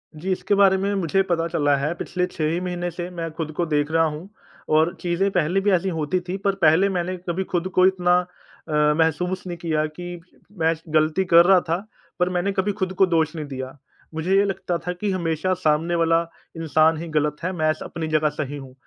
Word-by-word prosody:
जी 185 +5 -4
इसके 200 +2 0
बारे 195 -1 +5
में 200 +1 -1
मुझे 195 0 +1
पता 165 -1 +1
चला 145 -4 +2
है 150 +5 -1
पिछले 180 +1 -2
6 165 -4 -3
ही 170 - -1
महीने 175 -1 -3
से 175 +1 -6
मैं 165 -2 -4
ख़ुद 160 -2 -3
को 175 - 0
देख 150 -1 0
रहा 165 0 +3
हूँ 160 +4 -3 0.5
और 160 +2 +3
चीज़ें 180 +3 0
पहले 175 +4 +1
भी 205 0 +2
ऐसी 185 +1 +2
होती 160 +4 0
थी 180 - -2
पर 195 -1 +2
पहले 165 +5 +5
मैंने 185 0 -2
कभी 185 +3 -1
ख़ुद 180 0 0
को 185 - +6
इतना 180 -2 +3 0.5
अ, 150 0 +3
महसूस 180 +3 0
नहीं 175 -1 -5
किया 160 -2 -1
कि 175 +3 -7
म 195 +2 -26
मैं 160 0 +3 0.2
गलती 155 +4 +2
कर 170 -1 +6
रहा 190 0 +6
था 165 - +2 0.4
पर 180 0 +2
मैंने 180 +2 0
कभी 195 +1 0
ख़ुद 190 0 -1
को 190 - +8
दोष 165 -2 0
नहीं 155 -2 -4
दिया। 130 -1 -7 0.4
मुझे 165 +4 0
ये 200 - +5
लगता 190 -3 -2
था 180 - -5
कि 195 +3 -2
हमेशा 170 0 -1
सामने 165 -1 +1
वाला 165 0 +3 0.4
इंसान 160 0 +3
ही 170 +2 -6
गलत 150 -1 0
है, 185 - -1
मैं 155 -4 +1
स - - -15
अपनी 160 -1 -5
जगह 155 -1 +2
सही 145 -1 -5
हूँ। 135 -2 -10
170 Hz, 225 wpm, -23 LUFS, 155-185 Hz, 0.5 s, को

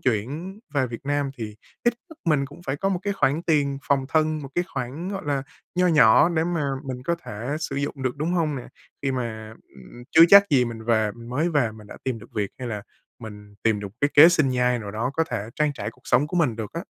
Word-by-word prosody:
chuyển 140 - -2 0.2
về 130 -2 +2
Việt 115 -1 -7
Nam 145 -1 0
thì 105 -2 -6 0.3
ít 240 -1 +3 0.2
nhất 320 - -13
mình 150 -4 +2
cũng 145 +5 -14
phải 135 - -1
có 195 - 0
một 190 -2 0
cái 200 0 -1
khoản 160 -3 +1
tiền 145 -4 +1
phòng 140 -2 +1
thân, 155 -1 +1
một 135 - -7
cái 175 - +1
khoản, 135 +7 -4
gọi 195 -1 -4
là, 140 -2 0 0.3
nho 180 0 +3
nhỏ 125 -3 +6
để 160 -2 0
mà 170 -3 -1 0.2
mình 130 -2 -5
có 170 +3 0
thể 120 +8 -4
sử 155 - -3
dụng 140 -1 -3
được, 130 0 -1
đúng 155 +5 -1
hông 160 -5 0
nè? 125 - -7 0.3
Khi 135 -1 0
mà, 110 -3 -4 0.2
ừm, 65 - -13
chưa 160 - +8
chắc 200 +2 +9
gì 130 -4 +4
mình 115 -2 -6
về 110 -2 +2
mới 125 +8 -2
về 140 -8 +1
mình 110 -1 -13
đã - - -10
tìm 130 -3 -2
được - - -15
việc 100 -2 -1
hay 125 -2 -5
là 105 -3 -4 0.4
mình 105 -3 -11
tìm 110 -2 +2
được 100 - -5
cái 145 - +2
kế 155 +3 +10
sinh 155 -5 +3
nhai 125 -1 +1
nào 105 -3 -6
đó 110 +5 -2
có 165 +2 +2
thể 110 -3 -3
trang 150 -1 +2
trải - - -4
cuộc 125 - -25
sống 125 +4 +3
của 180 +4 -4
mình 130 -10 +2
được 110 -2 -6
á. 165 - -4
135 Hz, 250 wpm, -24 LUFS, 115-155 Hz, 0.4 s, kế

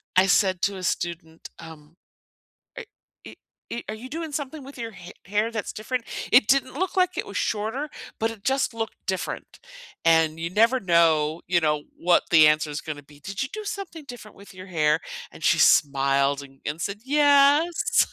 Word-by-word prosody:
I 185 +1 +5
said 190 -3 +2
to 200 - +1
a - - -7
student, 170 -2 -4
um, 160 -1 -13 0.8
"Are - - -6 0.4
e - - -10 0.3
e 235 - -4
Are - - -4
you 235 +4 -9
doing 320 +2 -5
something 285 0 -5
with 275 0 -12
your 230 -1 -5
ha 180 -2 -12 0.2
hair 210 +4 0
that's 220 -3 -4
different?" 235 +3 -3 0.3
It 240 -4 +6
didn't 270 0 +2
look 375 +5 -2
like 365 0 +2
it - - -3
was - - -8
shorter, 225 +8 -2 0.3
but 225 +1 0
it 225 -3 -11
just 265 -2 +1
looked 225 -1 -6
different, 190 -1 -4 0.5
and, 160 -1 +3
you 170 - -2
never 230 +6 +3
know, 165 -3 +2
you 175 0 +2
know, 150 -2 0
what 175 +1 +3
the 155 -2 +7
answer 150 0 +1
is 145 +1 -4
gonna 150 -2 -7
be. 145 +1 -19
"Did 195 - -5
you 265 - -2
do 430 0 -7
something 385 -7 -6
different 245 -5 -11
with 200 -1 -15
your 185 +1 -11
hair?" 155 -3 +2 0.3
and, - - -11
she - - +4
smiled 140 0 +3
and 135 -1 -15
and 150 +2 -3
said, 200 +2 -4
"Yes." 290 +3 +4
195 Hz, 190 wpm, -24 LUFS, 160-260 Hz, 0.8 s, the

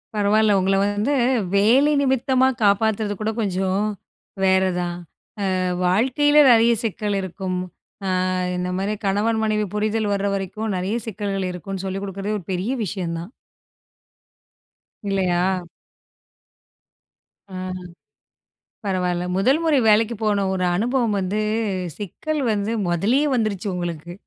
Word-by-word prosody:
பரவாயில்ல. 210 +1 +3
உங்களை 195 +1 +2
வந்து 205 +7 0 0.4
வேலை 245 +9 +4
நிமிர்த்தமா 260 -1 +2 0.2
காப்பாத்துறது 205 +1 +2
கூட 215 +1 -1
கொஞ்சம் 190 -1 0 0.6
வேறதான். 185 -2 +1 0.6
ஆ - - -1 0.3
வாழ்க்கையில 260 +10 +3
நிறைய 235 0 +5
சிக்கல் 210 -2 -2
இருக்கும். 185 0 -4 0.5
ஆ, - - 0 0.5
இந்த 180 0 -2
மாதிரி 200 +2 -1
கணவன், 210 +3 +1
மனைவி 215 -1 +1
புரிதல் 215 0 0
வர்ற 200 0 0
வரைக்கும் 200 +3 -3
நிறைய 190 +4 -2
சிக்கல்கள் 200 -2 -3
இருக்கும்னு 190 +2 -6
சொல்லிக் 190 +1 -3
கொடுக்கிறதே 200 +2 -3
ஒரு 195 - -8
பெரிய 185 +6 -1
விஷயம்தான். 175 -1 -4 1.8
இல்லையா? 185 -3 +1 2.0
ஆ. 195 - -14 1.3
பரவாயில்ல. 180 -2 -1
முதல் 260 +10 +3
முறை 310 -4 +3
வேலைக்கு 220 +2 +4
போன 205 -2 +1
ஒரு 185 -1 -1
அனுபவம் 235 +1 +1
வந்து 195 +2 -1 0.6
சிக்கல் 300 - -4
வந்து 210 +1 -1 0.2
முதல்லயே 210 - +2
வந்துருச்சு 215 -5 -1
உங்களுக்கு. 175 -1 -5
200 Hz, 110 wpm, -22 LUFS, 185-220 Hz, 2.0 s, நிறைய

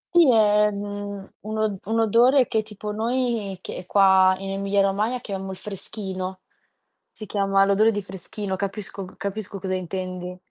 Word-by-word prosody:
Sì, 325 -7 +7
è, 210 -1 +5
mhmm, 205 -1 -5
un 215 +1 -5
o 210 -3 0
un 225 - +2
odore 240 +4 +5
che, 220 - +1
tipo, 210 -1 -7
noi 225 -3 -1
che 180 - -7
qua, 190 -1 +5
in 195 0 -5
Emilia 200 0 +1
Romagna, 210 +6 0
chiamo 195 -4 -5
il 190 - -6
freschino. 190 -2 -6 0.7
Si 215 - -8
chiama 195 -1 +2
l'odore 200 +3 +4
di 205 - -2
freschino, 190 +1 -4
capisco 200 0 -5
capisco 200 -1 -4
cosa 185 -1 -3
intendi. 185 0 -5
200 Hz, 155 wpm, -24 LUFS, 190-215 Hz, 0.7 s, Sì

